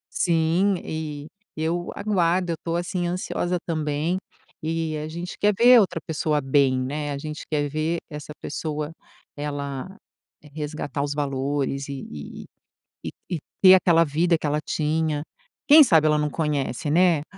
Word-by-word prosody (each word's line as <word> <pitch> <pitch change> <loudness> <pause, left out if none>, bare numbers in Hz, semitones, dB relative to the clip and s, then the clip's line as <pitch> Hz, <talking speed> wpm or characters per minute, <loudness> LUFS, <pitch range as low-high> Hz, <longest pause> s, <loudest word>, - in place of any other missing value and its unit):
Sim, 170 +3 +2
e 150 -2 -5 0.3
eu 170 +2 -2
aguardo, 180 -3 +1
eu - - -1
tô, 165 0 -2
assim, 175 0 -2
ansiosa 180 0 -2
também, 155 +2 -1 0.4
e 160 0 -2
a 150 0 -4
gente 170 +3 -6
quer 210 0 +3
ver 245 +1 +8
a - - +8
outra 180 -4 -1
pessoa 155 -1 0
bem, 135 -1 +2
né, 145 +3 -3
a 140 - -3
gente 150 +2 -6
quer 145 -1 +1
ver 155 +3 -1
essa 150 0 -7
pessoa 150 0 -4 0.4
ela 145 +4 -5 0.6
resgatar 150 -2 -4
os 145 0 -1
valores 140 -1 -2
e 140 -1 -6
e 75 -1 -8 0.6
e - - -2 0.2
e - - +1
e - - -9 0.2
ter 185 -1 +9
aquela 170 -3 +5
vida 165 +3 +2
que 155 - -6
ela 150 +1 +1
tinha. 155 -1 -1 0.4
Quem 305 +2 +10
sabe 165 - +4
ela 150 0 +4
não 150 0 0
conhece, 145 -2 -2
né, 170 -2 +4
155 Hz, 160 wpm, -24 LUFS, 145-175 Hz, 0.6 s, Quem